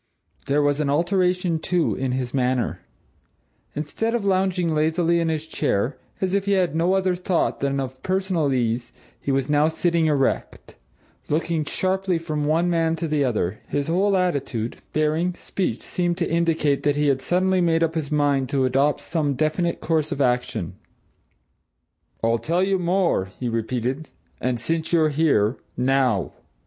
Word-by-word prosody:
There 145 +1 +2
was 145 0 +1
an 150 -2 0
alteration, 180 +2 +1
too, 175 +1 +1
in 130 -1 -2
his 125 -1 -3
manner; 130 -2 0 1.0
instead 190 +11 -2
of 225 -4 -2
lounging 185 -3 +1
lazily 165 +2 +2
in 165 -1 0
his 160 -1 -2
chair, 140 -5 -1 0.2
as 190 -1 -1
if 200 0 +1
he 200 - +2
had 180 -5 +1
no 170 +3 +2
other 190 -1 +1
thought 180 -1 0
than 140 0 0
of 130 -1 -5
personal 185 -6 0
ease, 120 -2 -1 0.3
he 140 - -1
was 135 -1 +1
now 150 +1 +3
sitting 165 0 +1
erect, 140 -3 -1 0.5
looking 160 +1 0
sharply 190 +2 0
from 155 -3 -3
one 165 +3 +2
man 165 -1 +1
to 165 0 -3
the 150 -2 +1
other; 110 -6 -1
his 145 +1 -2
whole 195 +3 +2
attitude, 140 -10 -1
bearing, 155 +4 0
speech 180 - -3
seemed 175 -1 -1
to 170 - 0
indicate 165 -4 +1
that 145 -1 +1
he 150 0 +1
had 135 -2 +2
suddenly 185 +4 +2
made 165 -1 +2
up 165 -1 0
his 155 -4 -3
mind 145 -3 +1
to 135 -2 +1
adopt 135 +3 +2
some 150 -5 -1
definite 155 +4 0
course 155 -2 0
of 145 - -3
action. 125 -2 0 1.5
"I'll 115 0 +2
tell 170 +7 0
you 190 0 +1
more!" 180 - +1
he 125 - -2
repeated. 125 +5 -2 0.3
"And, 125 -2 -1
since 160 +7 -2
you're 160 -2 +4
here 140 -7 +2 0.2
now!" 125 -5 +1
155 Hz, 165 wpm, -23 LUFS, 135-175 Hz, 1.5 s, you're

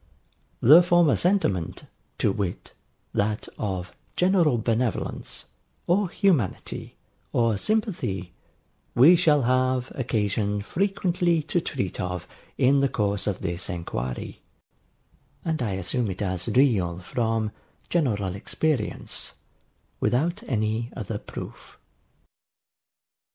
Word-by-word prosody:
The 150 +9 +9
former 175 -4 +4
sentiment, 135 - 0 0.3
to - - +2
wit, 95 -3 -4 0.4
that 105 +1 0
of 95 -2 -3 0.2
general 175 -8 +3
benevolence, 115 0 -2 0.4
or 185 +2 +2
humanity, 165 - 0 0.4
or 115 -2 +2
sympathy, 125 - -1 0.6
we 150 +9 +8
shall 155 -5 +4
have 130 +1 +1
occasion 105 -4 -1
frequently 175 - +1
to 175 +3 0
treat 95 - -3
of 90 -1 -4 0.3
in 135 +2 +4
the 140 0 +2
course 100 -4 0
of 100 -3 -1
this 85 +2 -2
inquiry; 75 -8 -4 1.0
and 160 -3 -1
I 105 -5 -1
assume 100 +5 -1
it 95 +2 -3
as 90 -2 -2
real, 105 -11 +3
from 110 +2 -1 0.4
general 105 - 0
experience, 130 +3 -2 0.7
without 170 - +1
any 110 +1 -1
other 105 -2 -4
proof. - - -9
115 Hz, 105 wpm, -25 LUFS, 100-160 Hz, 1.0 s, The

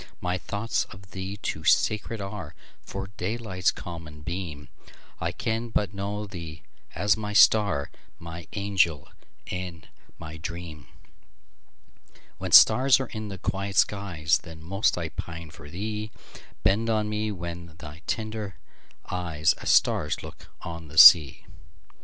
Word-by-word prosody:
My 90 +1 -2
thoughts 100 +6 -2
of 95 0 -15
thee 95 +1 -5
too 80 -6 -4
sacred 105 +6 +2
areFor 95 0 -8
daylight's 95 -2 -1
common 80 -3 -7
beam:I 85 -1 -7
can 115 +5 -3
but 105 -2 -1
know 100 +2 -4
thee 85 -6 -9 0.3
as 100 +4 +3
my 105 -1 -5
star, 100 -9 +4 0.3
My 85 0 -9
angel 95 -8 +1 0.4
and 90 -4 -6 0.3
my 80 -1 -9
dream; 80 -4 -7 1.5
When - - -4
stars 130 +4 +8
are 130 - -5
in 110 -1 -5
the 100 -1 -6
quiet 100 +2 -3
skies, 90 -7 +2
Then 80 -2 -12
most 100 +6 +1
I 85 -2 -3
pine 80 +1 -7
for 75 -1 -12
thee; 105 +5 -4 0.5
Bend 110 +5 +2
on 110 -1 +1
me 105 0 -2
then 85 -3 -7
thy 75 -1 -10
tender 110 -3 -4 0.5
eyes, 85 -4 +1
As - - -4
stars 75 - +2
look - - -11 0.2
on 85 -1 -7
the 75 +2 -12
sea! 75 -3 +9
90 Hz, 130 wpm, -26 LUFS, 80-105 Hz, 1.5 s, sea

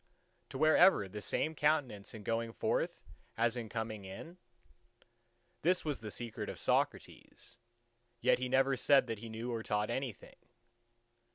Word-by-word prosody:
to - - -6
wear 155 +2 +5
ever 145 - +6
the 105 +3 -7
same 155 +8 0
countenance 145 -10 0
in 105 - -9
going 115 +2 -1
forth - - -1 0.3
as 115 +1 +2
in 115 -3 -5
coming 110 -2 -4
in? 160 - -9 1.2
This 180 +2 +2
was 150 -3 -2
the 110 - -7
secret 115 +3 -5
of - - -7
Socrates: - - -2 0.6
yet - - +3
he 125 0 -2
never 135 +1 +3
said 135 +1 +4
that 115 -3 -4
he 115 +1 -8
knew 115 +2 -4
or 115 - -2
taught 105 0 -1
anything. 130 -3 -5
115 Hz, 155 wpm, -34 LUFS, 110-135 Hz, 1.2 s, ever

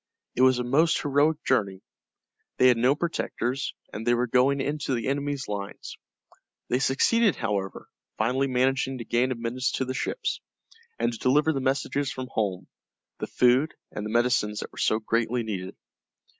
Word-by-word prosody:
It - - -1
was 130 -1 +5
a 125 - -1
most 155 +7 +3
heroic 150 +2 +1
journey. 100 -7 0 0.7
They 130 - +6
had 125 - +4
no 125 +4 +3
protectors, 135 -5 -2 0.2
and 105 - -5
they 120 +1 +3
were 120 +1 +1
going 130 +3 +3
into 140 -1 -1
the 115 - -3
enemy's 140 0 -2
lines. 100 -1 -6 0.7
They 125 - +2
succeeded, 200 - +3
however, 100 -1 -3 0.3
finally 130 +5 +1
managing 130 +1 +1
to 115 - -7
gain 120 +3 +1
admittance 120 +1 -2
to 130 - -1
the 130 - -3
ships, 135 - -2 0.6
and - - 0
to 115 - -8
deliver 150 +5 +3
the 135 - -2
messages 135 +1 0
from 130 -1 -6
home, 100 -4 -2 0.5
the - - -3
food, 125 +5 +3 0.2
and 105 - -5
the 105 - -4
medicines 120 -2 +1
that - - -7
were - - -11
so 110 - +2
greatly 115 +2 0
needed. 95 -4 -5
125 Hz, 170 wpm, -26 LUFS, 115-135 Hz, 0.7 s, They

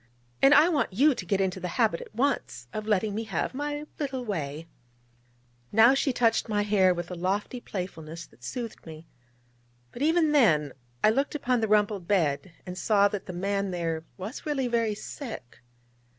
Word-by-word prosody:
And 275 - +7
I 315 - +7
want 305 - 0
you 280 +9 +5
to - - -6
get 200 -2 +1
into 190 -1 0
the 180 - -4
habit 220 -8 +2
at - - -12
once 230 - -1
of 215 0 -4
letting 210 0 +1
me 225 +2 -3
have 195 0 -2
my 290 +2 -3
little 265 -4 -3
way 160 -6 -4 0.5
' 120 0 -37 0.3
Now 225 +4 +7
she 275 0 +1
touched 230 -2 +1
my 205 -1 +1
hair 200 -3 +4
with 175 0 -4
a - - -3
lofty 195 +7 -2
playfulness 170 -5 -6
that 120 - -23
soothed 230 - -6
me: 160 0 -10 0.9
but 240 - -9
even 320 +1 +3
then 160 - +3 0.3
I 215 - +6
looked 275 +6 0
upon 250 -4 0
the 220 - +1
rumpled 210 -3 +2
bed, 175 -3 +1
and 180 0 -6
saw 205 -2 +4
that 205 -1 -5
the 185 - -5
man 200 +2 -1
there 165 -3 -2
was 205 +7 -6
really 280 -4 -1
very 230 -3 0
sick. 220 - -8
205 Hz, 185 wpm, -27 LUFS, 180-245 Hz, 0.9 s, And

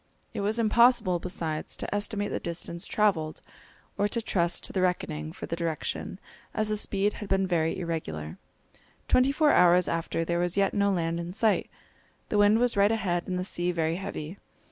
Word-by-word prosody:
It 215 - -3
was 210 +3 0
impossible, 230 -4 +4
besides, 165 -4 -3
to - - -4
estimate 205 0 -1
the - - -2
distance 170 0 -3
traversed, 175 -8 +1 0.6
or 205 - +3
to 230 - -2
trust 175 -6 0
to - - -6
the 190 - 0
reckoning 80 - -1
for - - -7
the - - -3
direction, 170 +2 -3 0.4
as 215 0 0
the 215 - 0
speed 205 0 0
had 210 - -8
been 195 0 +2
very 165 -3 0
irregular. 120 - -4 0.7
Twenty 255 +2 +4
four 300 +1 +3
hours 180 0 +5
after 165 0 -2
there 170 +1 0
was 175 +2 -1
yet 195 -1 +2
no 200 -1 +2
land 170 -2 -1
in 170 +1 -5
sight. 220 +2 +1 0.6
The 210 - +1
wind 205 +1 +5
was 245 0 +2
right 200 +1 +4
ahead 180 -6 -1
and 180 - -2
the 180 - -1
sea 180 -1 -1
very 165 -1 -1
heavy. 180 -1 -6
185 Hz, 190 wpm, -27 LUFS, 170-205 Hz, 0.7 s, hours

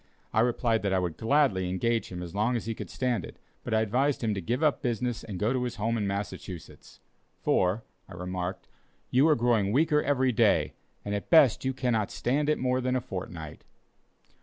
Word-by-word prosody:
I - - +2
replied 115 -1 +2
that 100 -2 0
I - - +3
would 90 -3 -1
gladly 110 -7 +2
engage 115 +5 -1
him 90 -1 -5
as 85 -1 -8
long 110 +5 +1
as 115 - -3
he 115 - -2
could - - -8
stand 125 -7 -1
it, - - -10 0.3
but - - -5
I 110 0 +3
advised 125 +6 +1
him 110 -2 +1
to 100 - -3
give 120 - -1
up 150 -2 +2
business 120 0 -2
and 100 -4 -6
go 105 +6 +1
to 130 - 0
his 125 -2 -3
home 115 +2 -1
in 105 -3 -1
Massachusetts; 100 -3 -6 0.4
"for," 95 +5 +2 0.3
I - - -9
remarked, 90 +1 -4 0.4
"you 135 +5 +5
are 155 - +5
growing 115 -5 +2
weaker 150 +4 +3
every 130 -3 +2
day, 110 - +3 0.3
and 100 - -2
at 100 - -4
best 145 -6 +6
cannot 120 -5 0
stand 145 +5 0
it 155 - +2
more 130 0 0
than 130 0 0
a - - +2
fortnight." 90 -7 -7
115 Hz, 205 wpm, -28 LUFS, 100-130 Hz, 0.4 s, best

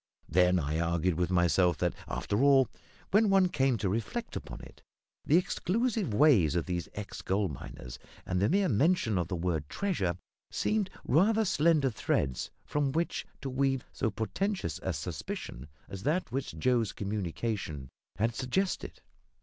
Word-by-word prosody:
Then 90 +1 +4
I 75 -1 -1
argued 85 +1 +1
with 85 +1 0
myself 90 -1 +3
that, 90 -1 0
after 100 +4 -1
all, 135 -2 +6 0.4
when 210 +1 +5
one 190 -2 +4
came 135 -6 +2
to 100 - -1
reflect 115 - -3
upon - - -6
it, - - -14 0.4
the 160 - +5
exclusive 205 - 0
ways 105 - +5
of 85 - 0
these 90 -2 -3
ex 105 -1 -6
gold 95 -2 0
miners 60 -3 -9 0.3
and 90 0 -1
the 100 - +3
mere 195 +3 +3
mention 130 - +2
of 85 - -1
the 90 - -3
word 80 -4 -2
"treasure" 100 - -1 0.3
seemed 210 -3 0 0.2
rather 215 - +3
slender 155 -5 +3
threads 65 - -1 0.2
from 145 -2 0
which 165 +4 -1
to 135 - -3
weave 135 0 0
so 115 - 0
portentous 110 - -2
a - - -1
suspicion 60 +4 -5 0.2
as 95 - -7
that 155 - 0
which 130 - -3
Joe's 115 +3 +1
communication 100 - -3 0.3
had 115 +2 0
suggested. 135 - -2
110 Hz, 155 wpm, -30 LUFS, -, 0.4 s, all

